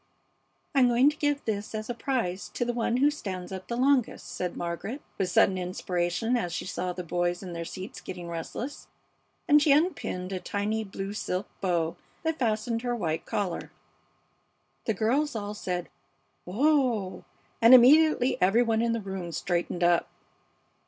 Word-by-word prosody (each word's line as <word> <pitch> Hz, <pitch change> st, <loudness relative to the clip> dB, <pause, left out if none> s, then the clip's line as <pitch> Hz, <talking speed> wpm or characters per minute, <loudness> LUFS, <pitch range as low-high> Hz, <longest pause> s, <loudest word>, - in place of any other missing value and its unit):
"I'm 265 Hz, -3 st, +5 dB
going 245 Hz, +4 st, +5 dB
to -, -, -11 dB
give 290 Hz, -2 st, -1 dB
this 210 Hz, 0 st, -3 dB
as 215 Hz, 0 st, -4 dB
a 240 Hz, -, -2 dB
prize 210 Hz, -6 st, -2 dB
to 240 Hz, -, 0 dB
the 240 Hz, -, -1 dB
one 235 Hz, 0 st, 0 dB
who 285 Hz, +3 st, +4 dB
stands 185 Hz, -11 st, -6 dB
up 190 Hz, -1 st, -7 dB
the 235 Hz, -, -3 dB
longest," 260 Hz, -1 st, +2 dB
said 180 Hz, -1 st, -3 dB
Margaret, 175 Hz, -, -4 dB, 0.2 s
with 190 Hz, -2 st, +1 dB
sudden 185 Hz, +1 st, +4 dB
inspiration 180 Hz, +5 st, -1 dB
as 175 Hz, -8 st, -1 dB
she -, -, -3 dB
saw 180 Hz, 0 st, -3 dB
the 180 Hz, 0 st, -5 dB
boys 175 Hz, +2 st, -1 dB
in 180 Hz, -2 st, -6 dB
their 170 Hz, 0 st, -4 dB
seats 190 Hz, +3 st, -7 dB
getting 180 Hz, -1 st, -7 dB
restless; 170 Hz, -, -6 dB, 0.6 s
and 295 Hz, 0 st, +6 dB
she 295 Hz, -, +4 dB
unpinned 280 Hz, -, +1 dB
a 185 Hz, -, -2 dB
tiny 205 Hz, +4 st, -2 dB
blue 195 Hz, 0 st, -5 dB
silk 190 Hz, -2 st, -3 dB
bow 170 Hz, -3 st, 0 dB, 0.3 s
that 320 Hz, -1 st, -1 dB
fastened 230 Hz, -1 st, 0 dB
her 245 Hz, 0 st, -1 dB
white 165 Hz, -8 st, -2 dB
collar. 200 Hz, -5 st, -2 dB, 1.1 s
The 220 Hz, -, 0 dB
girls 260 Hz, +7 st, +1 dB
all 205 Hz, -1 st, -3 dB
said 180 Hz, -4 st, -3 dB, 0.6 s
"Oh 245 Hz, -3 st, +2 dB
h -, -, -12 dB
h!" -, -, -20 dB, 0.4 s
and 230 Hz, +3 st, +10 dB
immediately 265 Hz, +1 st, +5 dB
every 195 Hz, +7 st, +5 dB
one 225 Hz, -1 st, +1 dB
in 230 Hz, 0 st, +1 dB
the 230 Hz, -, -2 dB
room 190 Hz, -3 st, -5 dB
straightened 175 Hz, +1 st, -1 dB
up. 175 Hz, 0 st, +3 dB
210 Hz, 170 wpm, -28 LUFS, 180-245 Hz, 1.1 s, and